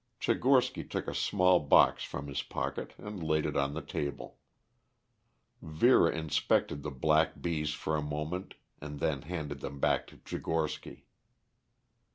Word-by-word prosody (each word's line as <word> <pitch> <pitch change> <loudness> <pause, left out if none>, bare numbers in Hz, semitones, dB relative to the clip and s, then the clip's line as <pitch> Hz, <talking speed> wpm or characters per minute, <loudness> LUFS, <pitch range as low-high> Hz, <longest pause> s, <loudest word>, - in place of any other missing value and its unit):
Tchigorsky - - +2
took - - -3
a - - -3
small 90 -1 +3
box 75 - +5
from 70 - -5
his 70 -1 -3
pocket - - -4
and 105 -3 -7
laid 80 -1 +1
it - - -2
on 70 +1 0
the 80 - -4
table. 70 0 -5 1.2
Vera 80 +12 +4
inspected 75 -2 0
the 75 - -4
black 75 +4 +2
bees 75 -3 -1
for 80 - -2
a 75 - 0
moment 75 +5 -4 0.3
and 75 0 -7
then 70 -3 0
handed 75 -3 -5
them 70 0 -6
back - - +1
to - - -15
Tchigorsky. 80 -2 -3
75 Hz, 145 wpm, -31 LUFS, 70-80 Hz, 1.2 s, box